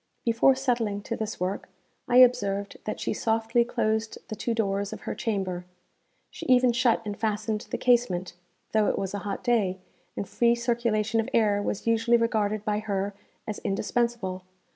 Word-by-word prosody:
Before 235 +3 +4
settling 235 -6 -1
to 230 - -3
this 220 -1 -4
work, 185 +2 -3 0.4
I 245 - +1
observed 205 -6 +4
that 215 - -3
she - - -1
softly 225 +2 +1
closed 220 -1 -1
the 215 - -4
two 230 +2 -2
doors 200 -2 -1
of - - -7
her - - -4
chamber; 190 -5 -2 0.7
she - - -8
even 255 -1 +5
shut 235 -1 +2
and 205 -1 -3
fastened 215 0 -2
the - - -2
casement, 230 -8 +2 0.4
though 215 -1 +3
it - - 0
was 195 0 -3
a 200 - -2
hot 200 0 -5
day, 210 -6 +1 0.4
and 200 - -3
free 235 +4 +3
circulation 235 -2 0
of 225 - -1
air 210 -3 +3
was 205 - -3
usually 230 +1 +3
regarded 215 -2 0
by 210 0 0
her 200 -2 -2 0.3
as 215 - -4
indispensable. 210 -2 -1
220 Hz, 170 wpm, -27 LUFS, 200-235 Hz, 0.7 s, even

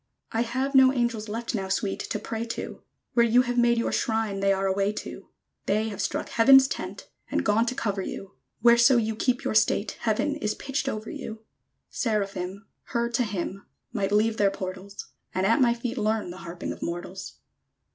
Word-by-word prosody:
_ - - -51 0.3
I 225 - 0
have 260 +4 -1
no 265 -1 +7
angels 235 -4 -1
left 230 +2 -3
Now, 195 -4 -2
Sweet, 195 +1 -1
to - - -3
pray 225 0 -4
to: 230 0 -6 0.3
Where 235 - +5
you 235 +2 +5
have 245 0 0
made 235 0 +4
your 230 - 0
shrine 220 -3 0
They 195 0 +3
are 195 0 +1
away 195 +2 +1
to. - - -7 0.4
They 215 +2 +1
have 205 -2 -5
struck - - -2
Heaven's 265 +3 +7
tent, - - -6 0.2
And - - -1
gone 220 +3 +3
to 250 - -1
cover 200 -5 -1
you: 195 +1 -6 0.3
Whereso 235 +2 +6
you 220 -1 0
keep 250 +3 0
your - - -1
state 215 -1 +2
Heaven 240 +7 0
is 210 -7 -2
pitched 275 0 -2
over 215 -2 -5
you! 220 0 -7 0.5
_Seraphim, 200 -4 -2 0.2
Her 235 0 -1
to 235 - +1
hymn, 195 -2 -4 0.3
Might 200 -4 -1
leave 215 +2 +2
their 200 -2 +4
portals; 195 +1 -7 0.2
And 185 +1 +1
at 230 +6 +3
my 235 -2 +4
feet 240 +1 -4
learn 215 -3 0
The 180 - -9
harping 170 -1 -6
of - - -14
mortals! 175 +2 -5
220 Hz, 195 wpm, -26 LUFS, 195-235 Hz, 0.5 s, no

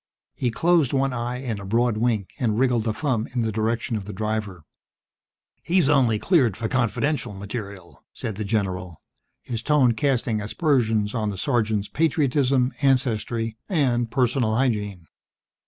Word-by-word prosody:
He 125 - -1
closed 165 +1 +2
one 135 -1 +1
eye 125 +2 -3
in 115 -6 -3
a - - -8
broad 115 +3 +1
wink 110 -3 0
and 110 -5 0
wriggled 120 -3 +2
a 110 - +1
thumb 125 -7 -1
in 120 - +1
the 110 - -1
direction 115 +2 -1
of 105 -3 -4
the 105 - -7
driver. 105 -3 -3 1.0
"He's 175 -4 +2
only 130 -7 +3
cleared 125 - +2
for 110 +1 -2
Confidential 125 0 -1
material," 100 -3 -8
said 110 - -5
the 105 - -4
general, 95 -5 -3 0.4
his 115 -2 -4
tone 145 -3 +3
casting 115 -3 0
aspersions 110 -3 +1
on 110 -3 -1
the 100 - -5
sergeant's 110 -4 0
patriotism, 135 -4 +1
ancestry 115 -4 0
and 125 - +1
personal 120 -2 +1
hygiene. 105 -8 -1
115 Hz, 150 wpm, -24 LUFS, 105-130 Hz, 1.0 s, only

